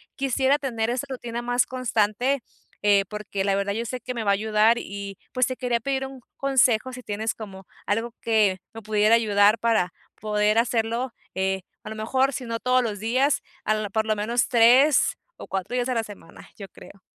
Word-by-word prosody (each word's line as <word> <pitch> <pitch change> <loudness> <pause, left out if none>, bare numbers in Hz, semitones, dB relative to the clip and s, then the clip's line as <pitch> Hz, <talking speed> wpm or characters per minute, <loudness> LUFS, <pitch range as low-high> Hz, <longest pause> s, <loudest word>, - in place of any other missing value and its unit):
quisiera 270 +1 +2
tener 235 -6 -2
esa 255 +3 -2
rutina 240 -2 -5
más 245 -1 +2
constante, 250 +1 0 0.4
eh, 200 -1 +4
porque 210 -2 -4
la 195 - +2
verdad 200 0 -1
yo 230 +2 -3
sé 250 +2 -5
que 250 - -5
me 225 - -2
va 200 - +3
a - - +5
ayudar, 220 +1 +3
y 200 0 -7
pues 255 -1 +2
te 255 - -3
quería 245 -2 -1
pedir 270 +2 -2
un 265 -1 -11 0.2
consejo, 260 -3 +2
si 250 0 -9
tienes 215 +2 -2
como 195 -4 -10 0.2
algo 225 +3 -1
que 215 -4 +2 0.2
me 225 - -8
pudiera 215 +1 +3
ayudar 210 -1 +4
para 220 -7 +1 0.3
poder 210 0 +1
hacerlo, 230 +1 0 0.2
eh, 190 0 0 0.2
a - - -8
lo 220 - -5
mejor, 260 +5 +1
si 260 - -4
no 230 0 -3
todos 255 0 +2
los 210 -4 -3
días, 255 +6 +1 0.2
al 215 -1 0
por 220 +1 0
lo 215 - +2
menos 230 +4 0
3 250 +5 +5 0.2
o - - -10
4 190 +5 -3
días 245 0 0
a - - +1
la 230 -2 0
semana, 205 -5 -13
yo 200 - -8
creo. 195 - -15
225 Hz, 200 wpm, -24 LUFS, 210-250 Hz, 0.4 s, a